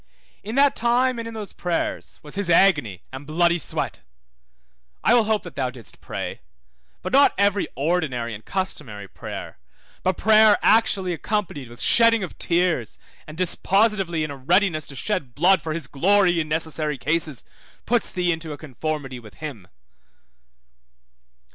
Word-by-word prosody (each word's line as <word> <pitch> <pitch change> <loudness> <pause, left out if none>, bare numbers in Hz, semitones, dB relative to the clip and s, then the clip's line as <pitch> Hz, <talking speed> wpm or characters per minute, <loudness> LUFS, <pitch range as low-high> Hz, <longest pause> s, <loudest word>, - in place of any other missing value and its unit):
In 215 +4 -6
that 280 0 +4
time, 245 +1 +1
and 230 - -5
in 230 - -8
those 210 -3 -6
prayers, 175 -2 -3
was 150 - -9
his 195 -2 -1
agony 150 - +3
and 135 +2 -8
bloody 170 +2 +2
sweat. - - -4 1.0
I 225 - +4
will 235 -2 +4
hope 215 -1 0
that 175 - -10
thou 130 -2 -1
didst 125 -4 -11
pray; - - -6 0.6
but - - -5
not 280 +1 +5
every 200 0 +2
ordinary 140 -7 -1
and 105 +1 -9
customary 140 - -4
prayer, - - -8 0.4
but 185 -1 0
prayer 215 -1 +6
actually 200 -5 +3
accompanied 175 - -3
with 120 -1 -13
shedding 230 -2 +5
of 185 - -8
tears 170 - 0 0.3
and 155 0 -10
dispositively 190 -1 +1
in 155 - -4
a - - -6
readiness 165 +2 +1
to 140 - -7
shed 140 - -3
blood 185 +5 +4
for 160 - -4
his 160 -2 -3
glory 175 +5 +2
in 155 -1 -3
necessary 155 -2 0
cases, 155 -1 -1 0.4
puts 240 0 +1
thee 180 -1 0
into 160 -2 -4
a - - -8
conformity 145 -2 -5
with 105 -4 -15
him. 130 - -8
170 Hz, 155 wpm, -23 LUFS, 145-200 Hz, 1.0 s, prayer